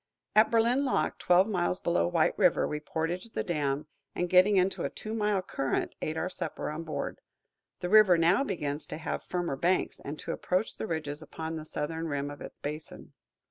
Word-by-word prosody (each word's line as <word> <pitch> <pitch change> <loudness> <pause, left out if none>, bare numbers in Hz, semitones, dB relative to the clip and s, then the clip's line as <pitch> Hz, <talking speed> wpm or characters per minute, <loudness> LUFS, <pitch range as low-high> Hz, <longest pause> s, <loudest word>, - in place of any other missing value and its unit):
At 215 +1 +6
Berlin 235 +4 +3
lock, 265 - 0
twelve 180 +3 +4
miles 180 -3 0
below 130 - +1
White - - +2
River, - - +3
we 150 - -3
portaged 170 +8 -3
the - - 0
dam, 150 -4 -1 0.3
and, 175 0 -1
getting 185 +3 +6
into 185 +1 +1
a - - 0
two 215 - -7
mile 210 -3 +1
current, 135 -6 -2
ate 155 +1 -2
our 170 - -1
supper 170 -4 -4
on 155 +2 -5
board. 155 - -4 0.6
The 180 - -2
river 210 -4 +7
now 175 +9 +4
begins 150 - -3
to 155 - -5
have 160 - -3
firmer 175 -5 -2
banks, 180 +5 +1
and 145 +2 -6
to - - -5
approach 185 +4 -1
the - - -4
ridges 155 -3 -3
upon 160 +1 -5
the 155 -1 -6
southern 160 +2 -3
rim 145 -1 -2
of 145 - -10
its - - -9
basin. 150 +1 -7
170 Hz, 195 wpm, -29 LUFS, 150-190 Hz, 0.6 s, river